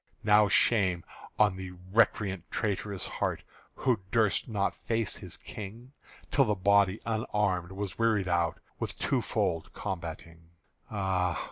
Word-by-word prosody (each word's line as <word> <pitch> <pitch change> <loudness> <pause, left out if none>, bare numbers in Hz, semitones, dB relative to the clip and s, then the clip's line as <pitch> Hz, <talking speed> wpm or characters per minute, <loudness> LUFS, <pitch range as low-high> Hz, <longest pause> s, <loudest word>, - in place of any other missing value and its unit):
(Now 105 0 +6
shame 95 -4 +3 0.3
on 105 -3 +4
the 95 -1 -6 0.2
recreant 105 -4 +2
traitor's 100 -2 -2
heart - - -2 0.3
Who 125 -5 +1
durst 110 +1 +2
not 100 -3 0
face 115 -3 -1
his - - -7
King 110 +5 -9 0.4
Till 135 - +4
the 105 -2 +1
body 100 +1 +3
unarmed 105 -5 0
was 100 0 -5
wearied 110 -4 +2
out 85 -2 +1 0.2
With - - -3
two - - +1
fold 80 -1 -1
combating! 85 -3 -6 0.4
Ah! 95 -4 0
100 Hz, 130 wpm, -30 LUFS, 90-110 Hz, 0.4 s, Now